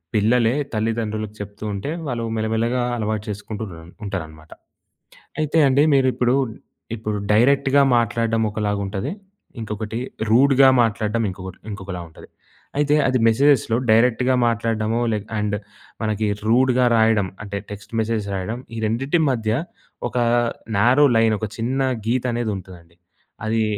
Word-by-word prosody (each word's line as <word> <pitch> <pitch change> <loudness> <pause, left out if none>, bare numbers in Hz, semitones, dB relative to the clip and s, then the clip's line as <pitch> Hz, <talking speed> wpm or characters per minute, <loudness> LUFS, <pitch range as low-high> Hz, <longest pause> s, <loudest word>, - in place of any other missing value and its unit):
పిల్లలే, 115 +3 +3 0.2
తల్లిదండ్రులకు 110 -1 -2
చెప్తూ 105 +1 -8
ఉంటే 100 +9 -4 0.2
వాళ్ళు 120 -3 -2
మెల్లమెల్లగా 115 +3 0
అలవాటు 110 -1 -2
చేసుకుంటూ 105 +1 -6
ఉన్నర 85 -3 -10 0.2
ఉంటారనమాట. 80 -5 -6 0.9
అయితే 155 +1 0
అండి 135 +2 +4
మీరు 135 -1 +4
ఇప్పుడు 125 +1 +2 0.6
ఇప్పుడు 105 -2 -3 0.2
డైరెక్ట్‌గా 135 +4 +4 0.2
మాట్లాడడం 115 0 0
ఒకలాగుంటది. 105 - -2 0.5
ఇంకొకటి 110 +1 -4 0.3
రూడ్‌గా 135 +2 +6
మాట్లాడడం 110 0 0
ఇంకొకటి 95 0 -8
ఇంకొకలా 95 -3 -6
ఉంటది. - - -15 0.5
అయితే 145 0 +3
అది 130 0 +2
మెసేజ్‌లో 120 -1 +3
డైరెక్ట్‌గా 125 +3 +3
మాట్లాడడమో 115 0 0
లె 105 - 0 0.2
అండ్ 105 0 -1 0.5
మనకి 110 0 0 0.2
రూడ్‌గా 125 +1 +3
రాయడం 110 -3 +3 0.2
అంటే 100 -1 -5
టెక్స్ట్ 105 +3 -10
మెసేజ్ 110 -1 -1
రాయడం 100 +6 -3 0.2
ఈ 115 - -4
రెండిటి 135 +10 0
మధ్య 110 -3 -1 0.6
ఒకా 120 +2 0 0.5
నారో 125 +8 +5
లైన్, 110 -1 +3
ఒక 110 - -2
చిన్నా 130 +4 0 0.2
గీత 125 +2 +1
అనేది 120 -2 -1
ఉంటదండి. 85 -3 -13 0.5
అదీ 110 +1 +1
110 Hz, 125 wpm, -21 LUFS, 105-125 Hz, 0.9 s, రూడ్‌గా